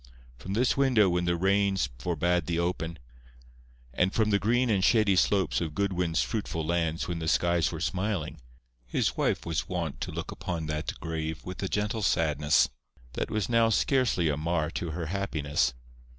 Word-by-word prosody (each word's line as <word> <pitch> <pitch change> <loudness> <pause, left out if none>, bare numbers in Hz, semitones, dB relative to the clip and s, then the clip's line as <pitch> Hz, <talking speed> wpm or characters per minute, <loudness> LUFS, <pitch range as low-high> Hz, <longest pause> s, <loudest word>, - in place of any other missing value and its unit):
From 90 +11 -6
this 120 +4 +2
window 125 -8 +4
when 90 0 0
the 85 0 +1
rains 95 -4 +2
forbade 85 +1 0
the 85 - -1
open, 85 -1 -2 1.0
and 90 +7 +2
from 110 0 +1
the 100 - +3
green 120 +5 +2
and 95 -3 +2
shady 105 -4 +4
slopes 95 -2 +2
of 80 -3 -4
Goodwin's 90 -4 0
fruitful 90 -8 -3
lands 85 -1 -1
when 85 -1 -3
the 80 - -4
skies 85 0 +2
were 80 - -5
smiling, 95 -1 -2 0.5
his - - 0
wife - - 0
was 80 -2 -2
wont 85 -5 -3
to - - -3
look - - -5
upon 85 -3 -4
that 75 0 -4
grave 80 -1 -4
with 90 0 -6
a 95 - -1
gentle 105 +3 -1
sadness 75 -6 +3 0.5
that - - -3
was 110 -3 -1
now 115 -1 +3
scarcely 120 - +2
a 75 -2 0
mar 80 0 -1
to 85 - -4
her 80 +1 -4
happiness. 75 -9 -1
85 Hz, 175 wpm, -28 LUFS, 80-100 Hz, 1.0 s, window